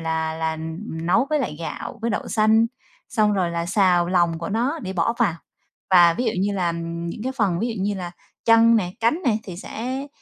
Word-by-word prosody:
là 160 -1 -1
là 160 0 -2 0.5
nấu 175 +10 +2
với 305 - +2
lại 150 - -3
gạo, 170 +7 -6
với 235 - 0
đậu - - -3
xanh, 220 +1 +4 0.4
xong 215 -3 +2
rồi 185 -4 0
là 170 0 -2
xào 180 -2 +3
lòng 175 -2 +2
của 165 - -5
nó 245 +9 0
để 190 - -4
bỏ 180 +5 +1
vào. 165 - +2 0.6
Và 175 -3 +7
ví 245 - -2
dụ 225 - +2
như 200 +1 0
là, 185 -3 0
ừm, 170 0 -4
những 170 - -6
cái 260 - -1
phần 200 -9 0
ví 235 - 0
dụ 190 - -2
như 205 +1 0
là 180 -2 -5 0.3
chân 230 0 +6
nè, 180 -5 0
cánh 235 +10 +1
nè 220 -4 +3
thì 180 -3 -8
sẽ 255 +8 -5
190 Hz, 225 wpm, -23 LUFS, 170-225 Hz, 0.6 s, Và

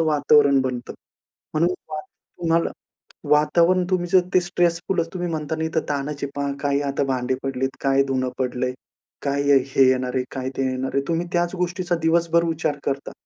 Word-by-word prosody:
वातावरण 145 -3 +4
बनतं. 125 -2 -3 0.6
म्हणून 165 +3 +3 0.2
फार 155 -1 -4 0.4
तुम्हाला 165 0 +1 0.6
वातावरण, 170 +4 +4
तुम्ही 180 -1 +1
जर 185 - +7
ते 185 - +6
स्ट्रेसफुलच 175 -1 0
तुम्ही 175 -1 -2
म्हणता 155 0 -3
ना, 160 - -2
इथं 160 0 0
ताणाचं 145 0 -2
आहे 140 - -11
पहा, 140 0 -1
काही 140 0 +1
आता 140 0 -1
भांडे 130 -1 -1
पडली 135 -1 -3
आहेत, 135 - -3
काय 135 0 +3
धुणं 130 -1 0
पडलंय, 125 0 -1 0.5
काय 140 0 0
ये 140 - +7
हे 135 -1 +4
येणार 130 -1 +1
आहे, 125 - +1
काय 130 0 -3
ते 135 -1 0
येणार 130 +1 -3
आहे, 140 - +2
तुम्ही 170 +1 0
त्याच 175 +1 0
गोष्टीचा 180 0 -1
दिवसभर 170 +1 +3
विचार 155 -2 -1
करता. 140 0 -3
145 Hz, 180 wpm, -23 LUFS, 135-170 Hz, 0.6 s, जर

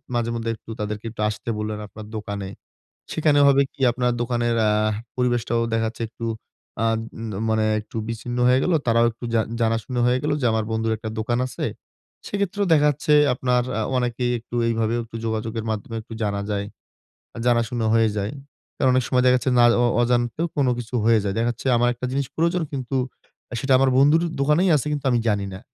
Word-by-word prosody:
মাঝে 120 -1 0
মধ্যে 115 0 -3
একটু 110 - -19
তাদেরকে 105 +1 -4
একটু 110 -1 -7
আসতে 105 +2 -6
বললেন 105 0 -3
আপনার 110 +1 -10
দোকানে। 100 -2 -5 0.6
সেখানে 150 -2 +3
হবে 140 0 +5
কী, - - -25
আপনার 125 0 0
দোকানের 120 -1 0
আহ 105 0 +1 0.2
পরিবেশটাও 120 -2 +1
দেখা 115 0 +1
যাচ্ছে 115 +1 -7
একটু 115 0 -7 0.6
আদ 115 0 0 0.5
মানে 110 0 +2 0.2
একটু 110 - -12
বিচ্ছিন্ন 120 +2 -4
হয়ে 130 +1 +4
গেল, 180 - +1
তারাও 115 0 +4
একটু 115 +2 -11
জা 115 - +4 0.2
জানাশুনা 115 +2 0
হয়ে 125 +1 +3
গেলো 150 0 +1
যে 125 - +1
আমার 110 -1 0
বন্ধুর 110 0 0
একটা 110 0 -6
দোকান 120 +2 0
আছে। - - -4 0.6
সেই 205 - -3
ক্ষেত্রেও 200 +1 0
দেখা 150 -1 +5
যাচ্ছে 150 +1 +1 0.2
আপনার 125 -1 +1 0.2
আ - - 0 0.2
অনেকেই 125 0 0
একটু 120 +1 -8
এইভাবেও 115 0 0
একটু 115 0 -9
যোগাযোগের 110 0 -2
মাধ্যমে 110 +2 -4
একটু 110 +1 -13
জানা 100 -1 -1
যায়। 100 -1 -1 0.7
আ - - -6
জানাশুনা 115 -1 +1
হয়ে 115 -1 +4
যায় 105 +3 -2 0.4
কারণ 130 - +3
অনেক 130 -1 +2
সময় 125 -1 +2
দেখা 125 - +6
যাচ্ছে 130 - 0
না 120 - +7 0.2
অ - - +3 0.2
অজান্তেও 120 +6 +1
কোনো 135 -4 +2
কিছু 120 0 -7
হয়ে 115 0 +5
যায়। 100 - -1
দেখা 115 +1 +1
যাচ্ছে 120 +3 -7
আমার 120 +1 +3
একটা 125 +1 -4
জিনিস 140 0 0
প্রয়োজন 170 +2 +1
কিন্তু 135 -1 -3 0.6
আ - - -4
সেটা 135 0 +1
আমার 135 0 +3
বন্ধুর 150 +5 +5 0.2
দোকানেই 150 +7 +3
আছে 145 - -2
কিন্তু 145 -1 -3
আমি 120 - +3
জানি 100 -2 0
না। 95 - -8
120 Hz, 200 wpm, -23 LUFS, 110-130 Hz, 0.7 s, না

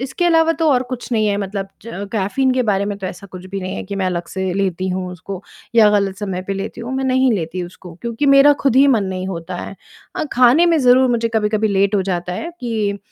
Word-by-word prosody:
इसके 270 +7 -2
अलावा 325 -1 +4
तो 320 - +3
और 250 0 +2
कुछ 250 0 -6
नहीं 215 -2 +2
है 205 - +1
मतलब 195 -1 -4
च - - -15
अ, 200 -3 -5
कैफीन 220 +6 +1
के 255 - +2
बारे 200 -3 +1
में 205 0 -3
तो 190 - -5
ऐसा 200 +2 -8
कुछ 185 -1 -11
भी 195 0 -5
नहीं 185 0 -4
है - - -4
कि 200 +1 -6
मैं 190 -1 0
अलग 175 -1 -2
से 190 -1 -3
लेती 190 -1 -1
हूँ 185 0 -3
उसको 185 +2 -8 0.3
या 220 -2 +7
गलत 200 -2 +1
समय 190 -3 -3
पे 195 - -4
लेती 195 +4 -5
हूँ, 240 +3 -5
मैं 265 - -1
नहीं 260 -1 +3
लेती 180 -2 -3
उसको 175 -1 -10
क्योंकि 235 +4 -2
मेरा 275 +1 +7
खुद 270 -3 +2
ही 275 - +7
मन 225 -6 +3
नहीं 185 -1 -4
होता 175 0 -5
है। 195 - -7 0.4
अ, - - -1
खाने 255 +7 +5
में 335 -2 +3
ज़रूर 255 0 +5
मुझे 230 -1 +1
कभी-कभी 215 0 +1
लेट 200 +1 +2
हो 195 - +2
जाता 180 -1 -3
है 325 - -5
कि 215 -4 -2
205 Hz, 255 wpm, -19 LUFS, 190-250 Hz, 0.4 s, या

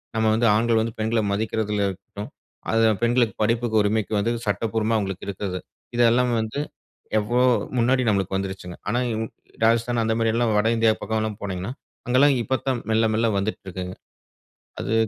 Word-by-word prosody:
நாம் 110 0 +2
வந்து 115 +2 +2
ஆண்கள் 115 0 +3
வந்து 115 - -2
பெண்களை 110 +1 +1
மதிக்கறதுலா 105 -1 0
இருக்கட்டும், 100 +2 -8 0.4
அது 115 0 +3 0.2
பெண்களுக்கு 120 -1 +2
படிப்புக்கு 115 0 +2
உரிமைக்கு 105 +1 0
வந்து 115 +3 0
சட்டபூர்வமா 110 +1 0
அவங்களுக்கு 95 -3 -3
இருக்குது. 95 -2 -3 0.4
இதெல்லாம் 120 +1 +4
வந்து 110 +6 -4 0.6
எவ்ளோ 120 +4 +1 0.3
முன்னாடி 125 +2 +3
நமக்கு 95 -2 0
வந்துருச்சுங்க. 95 -2 -5
ஆனா, 120 +4 +1
இன் 110 +1 -2 0.4
ராஜஸ்தான் 115 +1 +2
அந்த 110 0 +1
மாதிரி 115 -1 +1
எல்லாம் 115 -2 +2
வட 105 - +2
இந்தியா 115 -1 +4
பக்கம் 110 0 -1
எல்லாம் 110 -1 -3
போனீங்கனா, 95 +3 -3 0.4
அங்கெல்லாம் 135 +3 +5
இப்பதான் 130 -1 -1
மெல்ல 110 0 +3
மெல்ல 115 +1 +2
வந்துட்டிருக்கிங்க. 95 -2 -4 0.8
அது 115 - -2
110 Hz, 150 wpm, -24 LUFS, 105-115 Hz, 0.8 s, அங்கெல்லாம்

